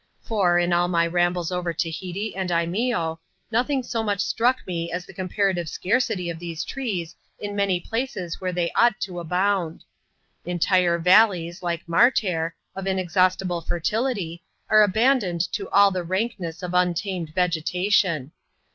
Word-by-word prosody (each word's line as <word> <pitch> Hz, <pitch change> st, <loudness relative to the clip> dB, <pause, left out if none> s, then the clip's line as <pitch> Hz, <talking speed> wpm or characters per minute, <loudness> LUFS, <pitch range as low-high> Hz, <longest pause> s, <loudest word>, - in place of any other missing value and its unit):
For, 195 Hz, -6 st, +2 dB
in 175 Hz, 0 st, +2 dB
all 175 Hz, 0 st, +3 dB
my 170 Hz, -1 st, +2 dB
ram 175 Hz, +1 st, +2 dB
bles 175 Hz, -1 st, -3 dB
over 180 Hz, -1 st, -2 dB
Tahiti 180 Hz, +6 st, -4 dB
and 190 Hz, -1 st, -2 dB
Imeeo, 170 Hz, 0 st, 0 dB, 0.3 s
nothing 255 Hz, +3 st, +1 dB
so 230 Hz, -1 st, -2 dB
much 205 Hz, -2 st, -1 dB
struck 245 Hz, +5 st, +1 dB
me 170 Hz, -2 st, -3 dB
as 180 Hz, +1 st, -4 dB
the -, -, -13 dB
comparative 185 Hz, -2 st, -1 dB
scarcity 190 Hz, -, 0 dB
of 165 Hz, -1 st, -4 dB
these 170 Hz, -1 st, -5 dB
trees 195 Hz, -11 st, -4 dB, 0.2 s
in 205 Hz, 0 st, -5 dB
many 200 Hz, -3 st, +1 dB
places 210 Hz, -5 st, -4 dB
where 185 Hz, -1 st, -1 dB
they 175 Hz, -1 st, -1 dB
ought 240 Hz, -1 st, +3 dB
to 180 Hz, -2 st, -4 dB
abound. 180 Hz, 0 st, -1 dB, 0.6 s
Entire 175 Hz, 0 st, +2 dB
valleys, 180 Hz, -1 st, +4 dB
like"'Martair, 170 Hz, 0 st, +1 dB, 0.2 s
of 195 Hz, 0 st, -5 dB
inexhausti 185 Hz, 0 st, +1 dB
ble 175 Hz, -1 st, -2 dB
fertility, 175 Hz, 0 st, -2 dB, 0.3 s
are 215 Hz, 0 st, +7 dB
abandoned 210 Hz, -3 st, +2 dB
to -, -, -3 dB
all 200 Hz, 0 st, +5 dB
the 185 Hz, -1 st, -2 dB
rankness 185 Hz, -1 st, -3 dB
of 180 Hz, 0 st, -4 dB
untamed 180 Hz, -1 st, 0 dB
vegetation. 180 Hz, -3 st, +1 dB
180 Hz, 145 wpm, -24 LUFS, 170-205 Hz, 0.6 s, are